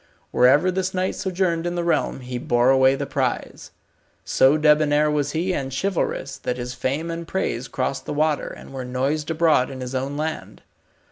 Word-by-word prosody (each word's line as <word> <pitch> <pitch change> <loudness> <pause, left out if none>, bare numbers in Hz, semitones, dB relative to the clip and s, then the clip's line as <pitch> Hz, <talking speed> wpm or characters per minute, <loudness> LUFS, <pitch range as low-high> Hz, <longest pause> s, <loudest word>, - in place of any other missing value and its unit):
Wherever 145 +9 +4
this 190 0 -2
knight 185 +1 0
sojourned 180 -3 -1
in 175 - -2
the 175 - -1
realm 170 -5 0
he 125 0 -5
bore 120 +1 +3
away 130 0 +5
the - - -3
prize. - - -3 0.6
So 135 +3 +4
debonair 150 0 +3
was 145 -1 -1
he 175 +4 0
and 135 -5 -3
chivalrous 140 -4 -2
that 125 - -3
his 125 0 -5
fame 140 +7 -2
and 165 0 -6
praise 135 -9 -2
crossed 130 +1 -3
the - - -3
water, 150 0 +1
and - - -10
were 130 -1 -5
noised 135 +5 -2
abroad 160 -5 +3
in 135 -1 -7
his 125 0 -6
own 135 +2 -2
land. 155 +1 -5
145 Hz, 185 wpm, -23 LUFS, 130-165 Hz, 0.6 s, away